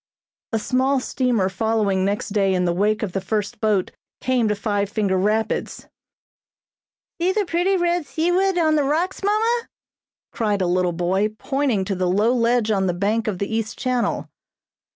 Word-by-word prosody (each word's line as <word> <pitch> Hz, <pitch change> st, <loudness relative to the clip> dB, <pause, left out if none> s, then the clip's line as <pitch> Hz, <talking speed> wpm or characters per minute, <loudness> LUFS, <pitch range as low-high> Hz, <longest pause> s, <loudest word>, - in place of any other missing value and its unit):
A 225 Hz, -, +1 dB
small 260 Hz, +4 st, +1 dB
steamer 250 Hz, -6 st, 0 dB
following 200 Hz, -1 st, 0 dB
next 200 Hz, +2 st, -1 dB
day 195 Hz, -2 st, +1 dB
in 180 Hz, 0 st, +1 dB
the 175 Hz, -, +1 dB
wake 210 Hz, +4 st, +1 dB
of 200 Hz, -, -2 dB
the 195 Hz, -, -2 dB
first 205 Hz, +2 st, -3 dB
boat, 210 Hz, -4 st, +1 dB, 0.3 s
came 255 Hz, -3 st, +1 dB
to 210 Hz, -, +1 dB
Five 205 Hz, -1 st, -1 dB
Finger 205 Hz, -3 st, 0 dB
Rapids. 215 Hz, +4 st, -1 dB, 1.4 s
"See 360 Hz, +2 st, +3 dB
the 415 Hz, +1 st, 0 dB
pretty 355 Hz, +3 st, +1 dB
red 345 Hz, -3 st, 0 dB
seaweed 355 Hz, +3 st, +1 dB
on 315 Hz, -2 st, +3 dB
the 295 Hz, -, +2 dB
rocks, 330 Hz, +7 st, -1 dB
mamma," 450 Hz, +4 st, +1 dB, 0.6 s
cried 205 Hz, -4 st, 0 dB
a -, -, +1 dB
little 180 Hz, 0 st, +1 dB
boy, 190 Hz, +5 st, 0 dB
pointing 270 Hz, -9 st, 0 dB
to 195 Hz, -, -2 dB
the 185 Hz, -1 st, 0 dB
low 210 Hz, +6 st, +3 dB
ledge 235 Hz, -2 st, +2 dB
on 195 Hz, -2 st, +1 dB
the 175 Hz, -, 0 dB
bank 210 Hz, +5 st, 0 dB
of 205 Hz, -4 st, -1 dB
the 200 Hz, +4 st, -3 dB
east 225 Hz, -1 st, -3 dB
channel. 250 Hz, -2 st, -1 dB
220 Hz, 175 wpm, -22 LUFS, 195-275 Hz, 1.4 s, See